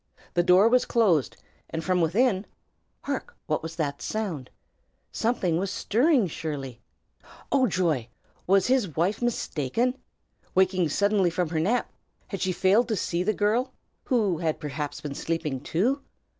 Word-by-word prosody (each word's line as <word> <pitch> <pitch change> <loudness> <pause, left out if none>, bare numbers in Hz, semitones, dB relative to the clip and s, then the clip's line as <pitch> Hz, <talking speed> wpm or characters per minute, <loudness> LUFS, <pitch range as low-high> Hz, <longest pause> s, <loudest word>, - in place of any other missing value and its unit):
The 175 - +3
door 180 +4 +6
was 250 +2 +3
closed, 190 - +2 0.3
and 165 0 -4
from 180 0 +1
within 195 +4 +2 0.6
hark! 480 - -4
what - - -1
was 165 0 -6
that 145 -4 -2
sound? 180 -12 -3 0.6
Something 190 -8 0
was 195 +1 -1
stirring, 245 - +2
surely. 140 -7 -5 0.7
Oh, 260 -2 +4
joy! 160 - 0 0.4
was 195 0 +4
his 250 - +1
wife 185 +8 0
mistaken? 240 - 0 0.6
Waking 185 -3 +3
suddenly 200 +2 +2
from 175 -1 -1
her 160 -1 -1
nap, 215 +10 0 0.4
had 195 - -5
she 185 - +1
failed 195 +6 +3
to 225 - 0
see 175 -3 -1
the 200 +4 +2
girl, 235 +5 +1 0.3
who 210 -10 +1
had 160 -3 -1
perhaps 145 0 -4
been 145 -2 -5
sleeping, 155 -3 -2
too? 235 - 0
185 Hz, 145 wpm, -26 LUFS, 160-220 Hz, 0.7 s, door